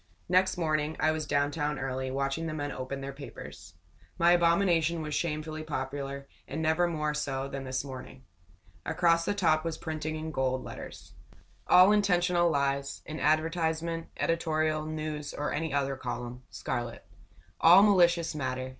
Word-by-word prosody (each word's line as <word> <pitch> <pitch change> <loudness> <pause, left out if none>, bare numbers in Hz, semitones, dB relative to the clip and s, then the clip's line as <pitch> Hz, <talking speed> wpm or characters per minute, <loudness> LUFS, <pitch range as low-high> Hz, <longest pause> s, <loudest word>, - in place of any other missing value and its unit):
Next 185 +1 +3
morning 155 -2 0
I 155 - +3
was 155 -1 -3
down 145 0 +1
town 150 -1 -2
early, 130 0 -3
watching 135 +4 -2
the 155 - -4
men 145 -1 -3
open 135 +1 -5
their 135 0 -5
papers. 140 0 -10 0.4
My 170 +1 +5
abomination 170 -1 +3
was 150 -1 -4
shamefully 155 0 -2
popular, 140 -2 -4 0.2
and 145 - -4
never 160 +2 +2
more 150 -3 -1
so 135 -2 -2
than 135 0 -6
this 130 0 -2
morning. 130 -1 -9 0.6
Across 170 -1 +2
the 205 - 0
top 160 -5 +2
was 165 -1 -3
printing 155 -1 -4
in 155 0 -5
gold 130 -2 -1
letters: - - -9 0.5
All 185 +3 +7
intentional 180 -4 +3
lies, 140 -2 -1
in 155 0 -6
adv., 155 +2 +2 0.6
editorial, 155 -2 0
news, 155 -1 -4
or 150 - -2
any 160 0 -2
other 140 -1 0
column.. 125 -1 -5
.Scarlet 120 -2 -4 0.5
All 175 +4 +8
malicious 175 -5 +4
matter. 130 -3 -3
155 Hz, 155 wpm, -29 LUFS, 140-165 Hz, 0.6 s, All